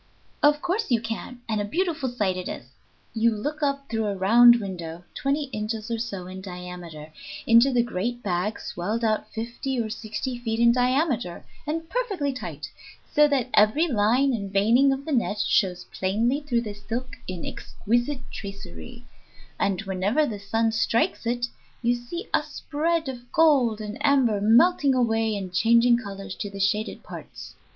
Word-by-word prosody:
"Of 295 Hz, 0 st, +4 dB
course 375 Hz, +5 st, -1 dB
you 240 Hz, -3 st, +3 dB
can, 230 Hz, +2 st, -6 dB
and 215 Hz, -2 st, 0 dB
a -, -, -1 dB
beautiful 320 Hz, -, -1 dB
sight 205 Hz, -6 st, 0 dB
it 185 Hz, 0 st, -4 dB
is. 125 Hz, +2 st, -8 dB, 0.4 s
You 225 Hz, 0 st, +2 dB
look 295 Hz, +9 st, -4 dB
up 280 Hz, -1 st, -1 dB
through 225 Hz, -2 st, -1 dB
a 200 Hz, -, -1 dB
round 235 Hz, +6 st, +7 dB
window, 175 Hz, -6 st, -5 dB
twenty 280 Hz, +2 st, 0 dB
inches 215 Hz, +1 st, -3 dB
or 230 Hz, -, -1 dB
so 200 Hz, -6 st, -4 dB
in 185 Hz, +1 st, -8 dB
diameter, 180 Hz, -4 st, -8 dB, 0.3 s
into 235 Hz, +4 st, +6 dB
the 245 Hz, -2 st, +3 dB
great 240 Hz, +2 st, -3 dB
bag, 185 Hz, +3 st, -1 dB
swelled 210 Hz, +7 st, -3 dB
out 215 Hz, -1 st, 0 dB
fifty 240 Hz, +3 st, -3 dB
or 220 Hz, -2 st, -2 dB
sixty 235 Hz, +4 st, -4 dB
feet 225 Hz, -2 st, -2 dB
in 235 Hz, 0 st, +6 dB
diameter, 250 Hz, -, 0 dB, 0.2 s
and 325 Hz, +2 st, -2 dB
perfectly 385 Hz, -, -1 dB
tight, 150 Hz, -, -6 dB, 0.5 s
so 300 Hz, 0 st, +6 dB
that 265 Hz, -3 st, 0 dB
every 215 Hz, +11 st, +4 dB
line 250 Hz, +2 st, +2 dB
and 200 Hz, -4 st, -3 dB
veining 230 Hz, +8 st, +4 dB
of 270 Hz, +1 st, -3 dB
the 315 Hz, -, -4 dB
net 235 Hz, -6 st, +1 dB
shows 180 Hz, -3 st, +1 dB
plainly 230 Hz, +9 st, 0 dB
through 250 Hz, -5 st, 0 dB
the 215 Hz, -3 st, -5 dB
silk 230 Hz, +5 st, -5 dB
in 185 Hz, -2 st, -5 dB
exquisite 240 Hz, +5 st, -2 dB
tracery, 85 Hz, -, -9 dB, 0.5 s
and 195 Hz, -1 st, +1 dB
wherever 195 Hz, +9 st, +1 dB
the 215 Hz, -7 st, -4 dB
sun 225 Hz, +3 st, 0 dB
strikes 230 Hz, +1 st, 0 dB
it 240 Hz, +1 st, 0 dB, 0.4 s
you 240 Hz, +1 st, +3 dB
see 245 Hz, -, -6 dB
a -, -, +4 dB
spread 320 Hz, +1 st, -2 dB
of 245 Hz, -2 st, -7 dB
gold 280 Hz, -10 st, +4 dB
and 215 Hz, +6 st, -6 dB
amber 260 Hz, -8 st, +3 dB
melting 270 Hz, -, +4 dB
away 225 Hz, -3 st, +1 dB
in 190 Hz, -2 st, -5 dB
changing 235 Hz, +5 st, +4 dB
colors 195 Hz, -4 st, -6 dB
to 205 Hz, -, -5 dB
the 200 Hz, 0 st, -9 dB
shaded 210 Hz, +3 st, 0 dB
parts. -, -, -10 dB
230 Hz, 170 wpm, -25 LUFS, 200-265 Hz, 0.5 s, round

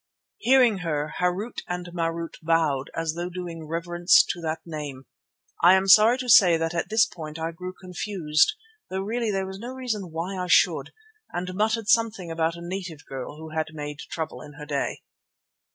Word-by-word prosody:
Hearing 250 Hz, -, +4 dB
her, 150 Hz, -3 st, -2 dB
Harût 180 Hz, +6 st, -1 dB
and 180 Hz, 0 st, -4 dB
Marût 165 Hz, -1 st, -2 dB
bowed 155 Hz, -4 st, +1 dB
as 165 Hz, -1 st, -1 dB
though 175 Hz, +2 st, -4 dB
doing 170 Hz, -3 st, -7 dB
reverence 175 Hz, +2 st, +3 dB
to 175 Hz, -, -3 dB
that 160 Hz, 0 st, -3 dB
name. 145 Hz, -5 st, -6 dB, 0.6 s
I 175 Hz, +2 st, +8 dB
am 190 Hz, 0 st, +1 dB
sorry 220 Hz, +5 st, +7 dB
to 255 Hz, -1 st, -5 dB
say 185 Hz, -7 st, +7 dB
that 165 Hz, +1 st, -2 dB
at 170 Hz, +1 st, -2 dB
this 220 Hz, +1 st, +5 dB
point 160 Hz, -6 st, -8 dB
I 165 Hz, +1 st, -3 dB
grew 180 Hz, +2 st, -7 dB
confused, 180 Hz, -, +1 dB, 0.3 s
though 190 Hz, 0 st, -2 dB
really 225 Hz, +3 st, -1 dB
there 195 Hz, -2 st, -1 dB
was 190 Hz, 0 st, -7 dB
no 240 Hz, +4 st, -6 dB
reason 220 Hz, -8 st, -3 dB
why 180 Hz, +4 st, -4 dB
I -, -, -4 dB
should, -, -, +3 dB, 0.4 s
and 180 Hz, +1 st, -4 dB
muttered 220 Hz, +2 st, 0 dB
something 220 Hz, -6 st, +2 dB
about 165 Hz, 0 st, 0 dB
a 170 Hz, 0 st, -9 dB
native 175 Hz, -5 st, -6 dB
girl 135 Hz, +2 st, -7 dB
who 160 Hz, 0 st, -9 dB
had 155 Hz, 0 st, -2 dB
made 150 Hz, -1 st, -6 dB
trouble 160 Hz, -1 st, -5 dB
in 145 Hz, -, -11 dB
her 150 Hz, 0 st, -9 dB
day. 145 Hz, -2 st, -3 dB
175 Hz, 185 wpm, -25 LUFS, 160-195 Hz, 0.6 s, I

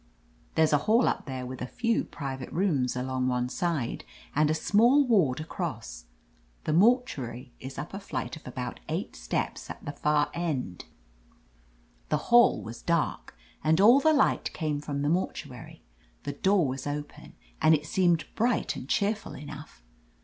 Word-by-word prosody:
There's 160 Hz, -1 st, +3 dB
a 145 Hz, -, +5 dB
hall 230 Hz, +3 st, +5 dB
up -, -, -1 dB
there, 130 Hz, -2 st, -4 dB
with 130 Hz, 0 st, -7 dB
a 125 Hz, -, -3 dB
few 230 Hz, -, 0 dB
private 135 Hz, -3 st, -6 dB
rooms 155 Hz, -10 st, +1 dB
along 130 Hz, 0 st, -1 dB
one 125 Hz, -1 st, 0 dB
side, 160 Hz, -4 st, -2 dB, 0.3 s
and 150 Hz, +1 st, +3 dB
a 155 Hz, -, +2 dB
small 240 Hz, -, +4 dB
ward 180 Hz, -, +3 dB
across. 115 Hz, -, -5 dB, 0.6 s
The 155 Hz, -, -1 dB
mortuary 165 Hz, -, +1 dB
is 130 Hz, +1 st, -8 dB
up 145 Hz, +6 st, -6 dB
a 195 Hz, -, -4 dB
flight 200 Hz, -, -4 dB
of 155 Hz, -, -13 dB
about 125 Hz, 0 st, -5 dB
eight -, -, -3 dB
steps, -, -, -3 dB
^t -, -, -9 dB
the 145 Hz, -, -3 dB
far 150 Hz, 0 st, +1 dB
end. 135 Hz, -, -3 dB, 1.2 s
"The -, -, +2 dB, 0.2 s
hall 240 Hz, 0 st, +6 dB
was 115 Hz, +1 st, -8 dB
dark, 170 Hz, -3 st, -1 dB, 0.3 s
and 160 Hz, +2 st, +3 dB
all 235 Hz, +7 st, +7 dB
the 315 Hz, +2 st, +4 dB
light 290 Hz, -3 st, +2 dB
came 155 Hz, -3 st, -2 dB
from 145 Hz, -1 st, -3 dB
the -, -, +1 dB
mortuary. 175 Hz, +4 st, -3 dB, 0.4 s
The 145 Hz, -, -3 dB
door 190 Hz, +1 st, +2 dB
was 130 Hz, +2 st, -4 dB
open, 145 Hz, 0 st, -6 dB, 0.3 s
and 160 Hz, 0 st, +6 dB
it 150 Hz, 0 st, -4 dB
seemed 170 Hz, -3 st, +2 dB
bright 235 Hz, +1 st, +1 dB
and 130 Hz, -, -8 dB
cheerful 210 Hz, +2 st, 0 dB
enough. 150 Hz, -, -10 dB
150 Hz, 165 wpm, -28 LUFS, 130-190 Hz, 1.2 s, all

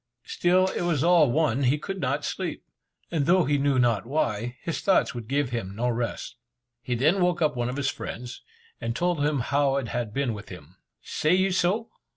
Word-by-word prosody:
Still 180 Hz, +1 st, +2 dB
it -, -, -3 dB
was 165 Hz, -5 st, +1 dB
all 170 Hz, -5 st, +5 dB
one, 145 Hz, -3 st, +1 dB
he 135 Hz, +2 st, +3 dB
could 195 Hz, +5 st, -5 dB
not -, -, -1 dB
sleep; -, -, -4 dB, 0.5 s
and 155 Hz, -5 st, 0 dB
though 180 Hz, 0 st, +4 dB
he 145 Hz, 0 st, +1 dB
knew 140 Hz, -1 st, +2 dB
not 115 Hz, -4 st, +2 dB
why, 120 Hz, -4 st, -1 dB
his 165 Hz, -, -3 dB
thoughts 195 Hz, -7 st, +2 dB
would 120 Hz, -3 st, -7 dB
give 140 Hz, 0 st, 0 dB
him 100 Hz, -5 st, -4 dB
no 120 Hz, +3 st, 0 dB
rest. 120 Hz, 0 st, -3 dB, 0.4 s
He 125 Hz, +1 st, -2 dB
then 155 Hz, +11 st, +2 dB
woke 180 Hz, -1 st, +2 dB
up 155 Hz, -4 st, +1 dB
one 120 Hz, 0 st, -1 dB
of 130 Hz, -, -4 dB
his 140 Hz, -2 st, 0 dB
friends, 120 Hz, +1 st, -7 dB, 0.4 s
and 115 Hz, 0 st, -3 dB
told 175 Hz, -2 st, 0 dB
him 145 Hz, -3 st, +1 dB
how 140 Hz, +2 st, +1 dB
it 135 Hz, -5 st, -2 dB
had 120 Hz, -2 st, -3 dB
been 135 Hz, -1 st, -1 dB
with 105 Hz, 0 st, -9 dB
him. 90 Hz, 0 st, -12 dB, 0.3 s
"Say 155 Hz, +4 st, +1 dB
you 190 Hz, +1 st, +2 dB
so?" 190 Hz, +5 st, 0 dB
140 Hz, 205 wpm, -26 LUFS, 120-170 Hz, 0.5 s, all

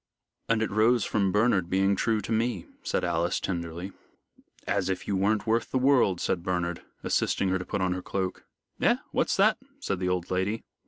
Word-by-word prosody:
"And 115 Hz, -1 st, +2 dB
it -, -, -2 dB
rose 110 Hz, +2 st, +3 dB
from 100 Hz, -3 st, +1 dB
Bernard 105 Hz, -4 st, +2 dB
being 95 Hz, +2 st, +2 dB
true 110 Hz, +2 st, +1 dB
to -, -, -6 dB
me," 110 Hz, -4 st, 0 dB, 0.2 s
said -, -, -1 dB
Alice, 85 Hz, 0 st, 0 dB
tenderly. 85 Hz, +1 st, -4 dB, 0.7 s
"As -, -, 0 dB
if 95 Hz, -, -3 dB
you 100 Hz, -, 0 dB
weren't 105 Hz, +3 st, +1 dB
worth 115 Hz, +1 st, +1 dB
the -, -, 0 dB
world," 130 Hz, -9 st, +3 dB
said 90 Hz, -, -1 dB
Bernard, 90 Hz, -2 st, -2 dB, 0.2 s
assisting 95 Hz, -, +1 dB
her 95 Hz, 0 st, +1 dB
to 90 Hz, -, -6 dB
put 100 Hz, -, -2 dB
on 95 Hz, -1 st, +1 dB
her 90 Hz, -, -4 dB
cloak. 95 Hz, -1 st, -3 dB, 0.4 s
"Eh, -, -, +5 dB, 0.2 s
what's -, -, +1 dB
that?" -, -, +4 dB, 0.2 s
said 100 Hz, -, -2 dB
the 90 Hz, 0 st, 0 dB
old 90 Hz, -1 st, -2 dB
lady. 95 Hz, +4 st, -1 dB
95 Hz, 195 wpm, -27 LUFS, 90-110 Hz, 0.7 s, Eh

